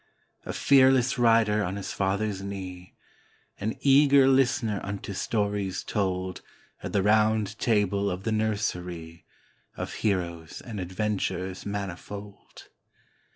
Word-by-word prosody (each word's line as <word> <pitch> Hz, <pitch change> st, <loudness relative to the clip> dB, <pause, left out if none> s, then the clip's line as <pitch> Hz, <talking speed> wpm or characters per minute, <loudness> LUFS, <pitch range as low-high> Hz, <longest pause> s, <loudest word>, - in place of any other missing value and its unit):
A -, -, -2 dB
fearless 130 Hz, -2 st, +4 dB
rider 115 Hz, -3 st, +4 dB
on 95 Hz, +1 st, -3 dB
his 100 Hz, -, -5 dB
father's 100 Hz, 0 st, -1 dB
knee, 95 Hz, -2 st, -7 dB, 0.6 s
An 110 Hz, +2 st, -2 dB
eager 140 Hz, -1 st, +6 dB
listener 120 Hz, -6 st, +2 dB
unto 100 Hz, 0 st, -5 dB
stories 100 Hz, -2 st, -1 dB
told 95 Hz, -3 st, -2 dB, 0.4 s
At -, -, -5 dB
the 100 Hz, -, +1 dB
Round 110 Hz, 0 st, +2 dB
Table 100 Hz, -3 st, +1 dB
of 90 Hz, +1 st, -4 dB
the 110 Hz, -, -1 dB
nursery, 90 Hz, -6 st, -3 dB, 0.5 s
Of -, -, -4 dB
heroes 85 Hz, -6 st, -2 dB
and 110 Hz, -4 st, -7 dB
adventures 95 Hz, 0 st, -3 dB
manifold. 100 Hz, +1 st, -7 dB
100 Hz, 110 wpm, -27 LUFS, 95-110 Hz, 0.6 s, eager